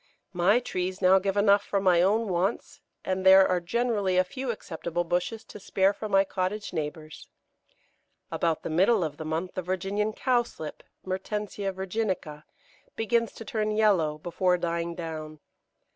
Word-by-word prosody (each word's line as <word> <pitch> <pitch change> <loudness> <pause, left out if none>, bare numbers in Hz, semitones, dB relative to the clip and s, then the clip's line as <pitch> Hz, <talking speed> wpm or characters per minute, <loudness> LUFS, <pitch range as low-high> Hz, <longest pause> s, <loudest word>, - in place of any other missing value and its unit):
My 185 +6 +4
trees 185 -5 -3
now 190 0 +5
give 195 +1 -2
enough 200 0 +4
for 200 - -1
my 180 -3 +4
own 215 +5 +2
wants, 190 +4 -2 0.2
and 185 0 -1
there 190 0 +8
are 180 - +1
generally 205 0 0
a 185 - +5
few 260 +7 -6
acceptable 175 -5 -3
bushels 180 +6 -2
to - - -12
spare 195 0 +2
for 215 +1 -6
my 195 -1 +5
cottage 190 +2 -3
neighbours. 155 -1 -5 1.0
About 165 -2 0
the - - -4
middle 190 +5 +3
of 150 -2 -4
the 155 - -6
month 160 +4 -3
the 185 - -3
Virginian 195 +4 -1
Cowslip 240 - -1 0.2
(Mertensia 195 +1 -3
virginica) 190 -6 -3 0.5
begins 230 +1 +1
to 225 - -10
turn 215 0 -1
yellow 200 -8 +2
before 180 +3 0
dying 170 0 -2
down. 155 -2 -6
190 Hz, 155 wpm, -27 LUFS, 170-210 Hz, 1.0 s, there